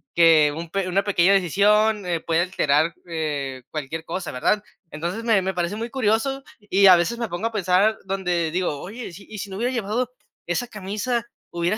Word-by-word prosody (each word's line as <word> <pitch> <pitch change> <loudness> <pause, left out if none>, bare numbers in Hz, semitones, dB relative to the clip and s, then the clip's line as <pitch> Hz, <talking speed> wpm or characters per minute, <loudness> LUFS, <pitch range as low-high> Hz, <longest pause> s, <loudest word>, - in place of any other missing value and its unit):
que 160 -3 +6
un 165 0 -6
peque 195 -1 -1
una 195 +2 +1
pequeña 195 -2 +3
decisión, 205 +3 +3
eh, 170 -2 0
puede 165 +1 +1
alterar, 160 -3 +1
eh, 145 -6 -3
cualquier 155 +1 -5
cosa, 180 +2 -4
¿verdad? 205 +11 +1 0.3
Entonces 175 +9 -4
me 225 -4 +3
me 190 +1 -1
parece 175 +2 -2
muy 230 +2 -5
curioso, 265 +3 0 0.2
y 200 -2 +4
a 185 - +10
veces 175 +8 0
me 230 -3 -2
pongo 175 +6 -2
a - - -5
pensar 200 +1 +2
donde 180 -4 -1
digo: 175 -4 -1
"Oye, 215 0 -8
si 195 +3 -13
y 215 - -8
si 195 +1 -6
no 190 - -6
hubiera 240 +4 0
llevado 240 +1 -2 0.4
esa 175 +8 -1
camisa, 215 +3 -3 0.3
hubiera 175 +4 0
190 Hz, 195 wpm, -23 LUFS, 170-215 Hz, 0.4 s, a